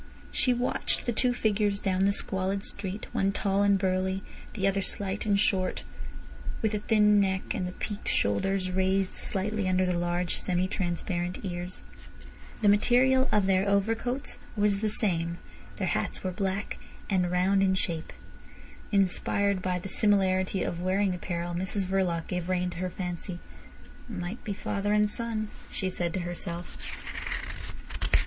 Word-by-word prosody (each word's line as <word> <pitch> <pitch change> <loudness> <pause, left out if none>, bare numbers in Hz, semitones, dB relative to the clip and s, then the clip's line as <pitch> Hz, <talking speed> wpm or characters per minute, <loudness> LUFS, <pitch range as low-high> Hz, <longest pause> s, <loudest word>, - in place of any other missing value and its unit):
She 255 - +2
watched 245 +1 0
the 240 - +1
two 245 +3 +2
figures 210 -3 +1
down 190 -1 +1
the 200 - +4
squalid 195 0 0
street, 200 +1 -3
one 195 0 +2
tall 195 0 +1
and 200 -1 +5
burly, 190 0 0 0.3
the 195 -3 +1
other 195 0 +1
slight 195 +2 -2
and 200 -1 +3
short, 185 -2 +1 0.8
with 220 -1 +2
a 210 - 0
thin 210 -1 +4
neck, 190 -1 0
and 180 - -2
the - - -4
peaked 205 +1 -5
shoulders 185 - +1
raised 190 +1 +1
slightly 205 0 -1
under 185 0 +3
the 180 -1 0
large 175 0 0
semi 180 0 0
transparent 175 0 -2
ears. 180 0 -5 0.8
The - - +5
material 255 +5 +5
of 210 -2 +3
their 190 +1 +3
overcoats 225 +7 0 0.2
was 205 -2 +2
the 215 +1 +1
same, 170 -6 0 0.4
their - - -1
hats - - -1
were 185 - -1
black 195 +2 -2 0.3
and 180 -3 +2
round 185 +2 +3
in 190 -1 +3
shape. 165 -3 -1 0.8
Inspired 200 0 +2
by 180 -1 0
the 180 - -6
similarity 190 -2 +3
of 170 - -3
wearing 190 +1 +2
apparel, 175 -1 -3
Mrs 190 +2 -1
Verloc 180 -3 0
gave 180 -1 -3
rein 180 -1 +1
to 175 - -8
her 185 +1 -1
fancy. 180 0 -4 0.7
"Might 190 +1 -5
be 210 - -2
father 205 0 -1
and 210 0 +4
son," 220 -1 -2 0.2
she 190 -1 -2
said 175 -2 -1
to 190 - -1
herself. 175 0 -5
190 Hz, 155 wpm, -29 LUFS, 180-205 Hz, 0.8 s, and